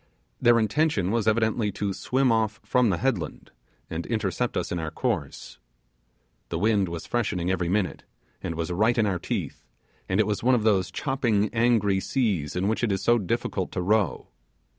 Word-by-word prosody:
Their 120 0 +5
intention 110 - +1
was 115 -2 0
evidently 110 -1 +2
to 100 0 -2
swim 130 +5 +1
off 110 -1 0
from 125 -3 +3
the 90 - +1
headland - - -2 0.4
and 85 +1 -5
intercept 110 +1 -1
us - - -2
in 90 - -1
our 80 -1 -3
course. 75 - -3 0.9
The 85 - -2
wind 100 0 +2
was 85 -1 -6
freshening 100 -7 -1
every 90 -2 -1
minute, 100 0 0 0.4
and 85 - -4
was 85 +1 -3
right 110 +7 +2
in 110 - +3
our 95 -4 0
teeth, - - -4 0.5
and 95 +2 +1
it 110 - +4
was 105 -1 -2
one 125 +2 +4
of 115 - 0
those 100 -5 +2
chopping 120 -7 0
angry 115 -4 +2
seas 95 - -1
in 90 +2 0
which 110 +3 -1
it 115 - +2
is 95 - -1
so 120 0 +4
difficult 95 - -2
to - - -1
row. 105 -2 +1
105 Hz, 185 wpm, -26 LUFS, 90-115 Hz, 0.9 s, Their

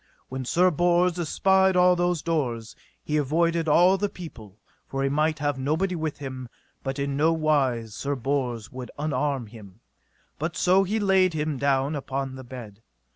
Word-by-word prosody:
When 130 0 -5
Sir 180 +8 +3
Bors 175 +2 +2
espied 190 +3 +3
all 180 0 +5
those 175 -2 0
doors, 125 -9 -2 0.3
he 150 - -1
avoided 165 +3 +1
all 180 +5 +5
the 205 - 0
people, 110 - -11 0.3
for 135 0 -2
he 135 - +1
might 155 +2 +1
have 145 -2 -1
nobody 160 +8 0
with 160 -3 -3
him; 130 -3 -7 0.3
but 135 +1 -4
in 140 0 -2
no 155 +3 +3
wise 135 -8 +1
Sir 140 +6 -2
Bors 125 -3 -2
would 130 -1 -7
unarm 145 -3 -1
him, 105 -3 -13 0.6
but 160 +3 -3
so 185 +2 +4
he 215 +4 -1
laid 190 -4 +3
him 150 -3 -2
down 140 +1 +1
upon 135 -1 -3
the 130 0 -9
bed. 120 -5 -10
145 Hz, 170 wpm, -25 LUFS, 130-170 Hz, 0.6 s, all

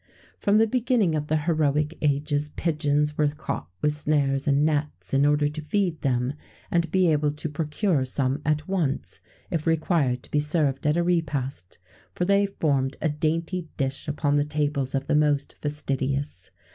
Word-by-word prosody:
From 205 +1 +3
the 220 - +5
beginning 235 -6 +1
of 150 -1 -2
the 155 - +2
heroic 150 -1 +1
ages, 145 0 0
pigeons 150 -2 0
were 150 - +4
caught 145 - -4 0.2
with 150 - +4
snares 145 -2 +1
and 140 +1 +3
nets,[XVII 150 -2 -1
89] - - +3
in - - +5
order 150 0 +2
to 150 +1 -5
feed 175 0 -1
them, 125 0 0 0.4
and 170 -1 +1
be 185 -1 +3
able 150 -1 +2
to 150 +2 -4
procure 155 +1 0
some 130 +2 -1
at 150 0 0
once, 170 -8 -2 0.3
if 165 -2 -2
required 155 -6 +1
to - - -17
be 150 - +2
served 150 -2 +1
at 150 +2 +2
a 175 - +2
repast; 140 - -2 0.4
for 180 - 0
they 200 +1 +3
formed 140 -8 0
a 160 - 0
dainty 165 +4 -1
dish 135 -1 -2
upon 145 -1 +1
the 145 - +3
tables 145 -2 -1
of 135 0 -1
the - - 0
most 150 -2 +2
fastidious. 140 -7 -2
150 Hz, 175 wpm, -25 LUFS, 140-160 Hz, 0.4 s, the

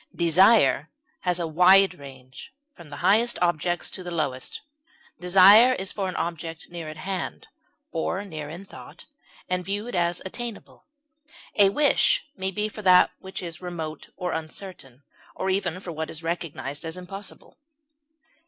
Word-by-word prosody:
Desire 170 - +4 0.3
has 180 -1 -1
a 170 - -1
wide 180 +4 +5
range, 135 - -12 0.2
from 170 -4 -14
the 145 - -8
highest 225 +5 +4
objects 175 0 0
to - - -4
the 180 - -6
lowest; 145 -7 -3 0.6
desire 195 +7 +7
is 195 -5 -3
for 195 -2 -3
an 185 - -6
object 165 -1 -5
near 170 -3 -6
at 155 - -9
hand, 185 +4 -5 0.4
or 180 +4 -2
near 155 -6 -7
in 175 +5 -9
thought, - - -13 0.4
and 180 0 -1
viewed 205 +5 -4
as 175 -1 +1
attainable; 235 +3 -7 0.7
a 200 -2 +6
wish 290 +8 +3
may 190 -4 -2
be 210 +2 -2
for 215 0 -8 0.4
what 190 0 -7
is 170 -1 -6
remote 165 -3 -6
or 180 -1 -3
uncertain, 155 -5 -7 0.3
or 190 - -1
even 185 -2 -1
for 185 -2 -7
what 160 0 -5
is 160 +1 -5
recognized 150 -5 -4
as 165 +2 -5
impossible. 195 +7 -9
180 Hz, 150 wpm, -25 LUFS, 160-195 Hz, 0.7 s, desire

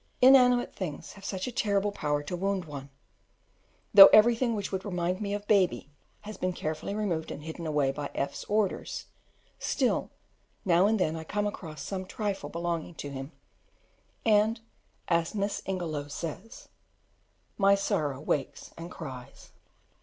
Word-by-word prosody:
Inanimate 250 -1 +6
things 170 -7 -6
have 200 - -15
such 190 -1 -3
a 250 - -4
terrible 205 -4 +1
power 145 -7 -1
to 160 +5 -4
wound 195 0 -1
one: 140 -2 -8 1.0
though 200 -1 +13
everything 235 +2 +5
which 205 -2 -4
would 190 -1 -3
remind 180 -1 -2
me 200 -1 -1
of 205 0 -7
Baby 185 -7 +2 0.3
has 215 0 -8
been 185 0 -1
carefully 155 +4 -4
removed 180 -7 -2
and 150 - -7
hidden 160 +1 -6
away 145 -3 +1
by 145 +1 -5
F 140 0 -1
's - - -7
orders, 210 -2 -1 0.5
still - - 0 0.6
now 180 +1 +4
and 220 0 +2
then 160 -3 +1
I 160 - -5
come 205 +5 -2
across 160 -8 -6
some 190 +2 -5
trifle 205 -1 -3
belonging 170 0 -3
to 145 - -6
him, 135 +2 -6 0.9
and, 220 +1 +3 0.5
as 170 +2 +1
Miss 200 0 -1
Ingelow 165 -6 -3
says 175 - -7 0.9
"My 200 0 +6
old 200 - +2
sorrow 155 -10 -1
wakes 145 -2 -3
and 165 +1 -8
cries." 130 -8 -9
185 Hz, 155 wpm, -29 LUFS, 155-205 Hz, 1.0 s, though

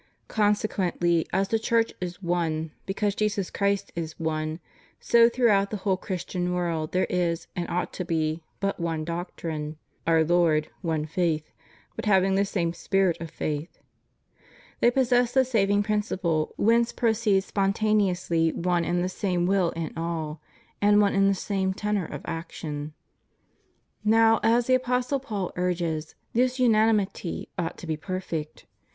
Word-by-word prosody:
Consequently 190 -5 +1
as 195 0 +1
the 225 - +1
Church 230 0 +1
is 180 +1 -5
one, 165 -2 -1 0.2
because 200 +1 0
Jesus 210 -2 -1
Christ 200 -1 0
is 160 -2 -5
one, 155 0 -2 0.4
so 235 0 +5
throughout 215 -5 +3
the 215 - -3
whole 195 -1 +1
Christian 180 -1 -3
world 165 -3 -1
there 185 - +2
is, 175 -2 -1
and 175 -2 -3
ought 180 - -2
to 180 - -3
be, 160 -2 -1 0.2
but 195 -1 -1
one 165 -2 -2
doctrine: 165 -3 -4 0.3
One 165 -1 +4
Lord, 160 -2 +2
one 160 -4 -1
faith; 160 -1 0
^ - - -35 0.4
but - - -5
having 195 -2 +4
the 200 +1 +3
same 170 -4 -1
spirit 190 -1 +1
of 165 - -5
faith,^ 150 +2 -4 1.0
they 240 - +5
possess 245 -1 +2
the 265 -1 +5
saving 205 -4 +2
prin 210 0 +1
ciple 170 -7 -1
whence 230 +2 +3
proceed 220 -4 +2
spontaneously 195 -5 +1
one 175 -1 0
and 175 +1 0
the - - 0
same 180 -2 -1
will 190 -2 +2
in 165 -2 -4
all, 160 -2 -3 0.4
and 205 0 +5
one 205 -1 +3
and 195 0 +4
the 195 - +2
same 190 0 -1
tenor 210 -3 -1
of - - -7
action. 155 -2 -5 1.1
Now, 225 +1 +5
as 235 +1 +3
the 255 - +2
Apostle 255 +1 +1
Paul 210 -8 -4
urges, 170 -4 -2 0.2
this 250 +2 +2
unanimity 215 -6 +1
ought 170 0 -2
to - - -9
be 160 -2 -2
perfect. 165 -3 -5
185 Hz, 155 wpm, -26 LUFS, 165-210 Hz, 1.1 s, so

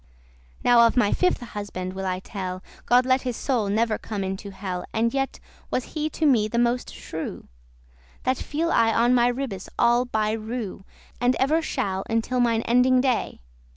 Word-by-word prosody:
Now 235 -1 +6
of 230 - -2
my 210 -4 +4
fifthe 365 -8 +1
husband 185 -3 -5
will 190 0 -4
I 185 0 -2
tell: 185 -3 -5 0.2
God 250 +1 +5
let 255 0 +3
his 250 -3 -3
soul 235 -7 0
never 220 +1 +1
come 205 -3 -4
into 190 +2 -4
hell. 190 -2 -5
And 230 +1 +1
yet 270 -1 -2 0.3
was 255 - -3
he 310 0 -1
to 315 - -2
me 235 -7 +4
the 235 - -3
moste 240 +1 +1
shrew;* 160 - -7
*cruel, - - -3
ill - - -11
tempered - - -30
That 255 0 +1
feel 325 +3 -1
I 225 -1 +4
on 240 +2 +4
my 240 -1 +4
ribbes 245 -6 -3
all 240 +1 +4
*by 215 -3 0
rew,* 220 +2 -4
*in 240 - -2
a 195 - -5
row 190 - -15 0.4
And 250 - +4
ever 305 +5 +2
shall, 195 -10 -2
until 230 +3 0
mine 230 -2 +2
ending 250 +2 +4
day. 250 - 0
230 Hz, 205 wpm, -24 LUFS, 195-250 Hz, 0.4 s, Now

